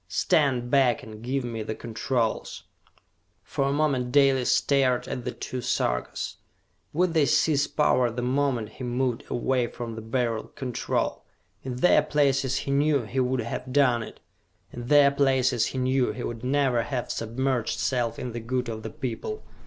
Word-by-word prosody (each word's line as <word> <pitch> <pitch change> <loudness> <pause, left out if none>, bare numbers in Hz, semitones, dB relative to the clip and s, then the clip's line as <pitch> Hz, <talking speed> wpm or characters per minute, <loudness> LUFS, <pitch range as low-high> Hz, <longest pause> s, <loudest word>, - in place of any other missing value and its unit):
Stand 125 - +1
back 130 -4 +3
and 110 -1 -10
give 130 +3 -2
me 115 -2 -4
the 110 0 -4
controls!" 115 0 -2 0.8
For 135 - -2
a 140 - +1
moment 140 -4 0
Dalis 135 -2 +4
stared 135 -3 +2
at 125 - -5
the 125 - -2
two 125 0 -5
Sarkas. - - -2 0.5
Would 175 +2 +1
they 155 -4 +3
seize 145 -3 +3
power 130 -5 +2
the 120 +2 -4
moment 125 -4 0
he 130 - -10
moved 125 0 -1
away 125 0 0
from 120 -1 -6
the 110 - -7
Beryl 115 0 -1
Control? 125 -3 -2 0.4
In 130 -2 -5
their 150 +5 +5
places 140 -3 +1
he 140 - -2
knew 140 -1 +2
he 125 +5 -3
would 130 0 +1
have 115 +3 -5
done 125 -4 +3
it. 110 - -9 0.5
In 120 0 -7
their 145 -1 +6
places 130 -4 +2
he - - -5
knew 130 0 +1
he 125 - -6
would 115 0 -5
never 130 -2 +2
have 120 +1 -3
submerged 120 +1 -1
self 125 -3 -1
in 125 - -4
the 120 - -5
good 125 +1 -2
of 110 -1 -5
the 110 - -6
people. 145 - -5
125 Hz, 170 wpm, -26 LUFS, 120-140 Hz, 0.8 s, their